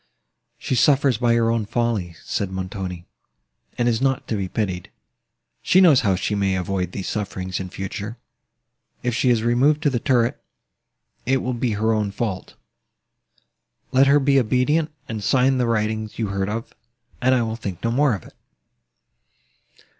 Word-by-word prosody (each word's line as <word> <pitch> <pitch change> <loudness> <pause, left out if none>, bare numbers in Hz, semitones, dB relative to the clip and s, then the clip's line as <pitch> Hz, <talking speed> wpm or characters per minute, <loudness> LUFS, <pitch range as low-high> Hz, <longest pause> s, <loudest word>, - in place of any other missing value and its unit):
"She - - -3
suffers 135 -1 +3
by 120 -1 +3
her 115 -1 +2
own 115 -3 -1
folly," 110 -7 -1
said 100 - -2
Montoni, 95 -2 -5 0.7
"and 120 - +1
is 115 0 +1
not 135 -1 0
to 110 - 0
be 100 -2 -2
pitied;—she 90 - -3
knows 165 -8 +7
how 100 -4 +2
she 95 +3 -2
may 100 -2 +1
avoid 90 -1 -2
these 95 - -5
sufferings 95 -3 -3
in 95 -1 -5
future—if 110 +4 -8
she 125 +2 +2
is 115 -2 +2
removed 135 +6 +2
to 145 - +3
the 120 - 0
turret, 120 -4 +1 0.8
it 135 0 +2
will 125 - -1
be 120 -1 -1
her 110 +2 +1
own 105 -2 0
fault. 100 -2 -4 1.4
Let 135 +1 +5
her 140 +1 +5
be 135 0 +3
obedient, 130 +7 +1 0.2
and 110 -2 -5
sign 130 +3 +3
the 125 - +1
writings 110 -1 -1
you 110 -3 -2
heard 100 0 -2
of, 115 +2 -5 0.5
and 130 +1 +4
I 120 - +2
will 110 0 -3
think 100 -6 -6
no 115 - +1
more 135 -1 +3
of 95 - -9
it." - - -15
115 Hz, 160 wpm, -22 LUFS, 100-125 Hz, 1.4 s, knows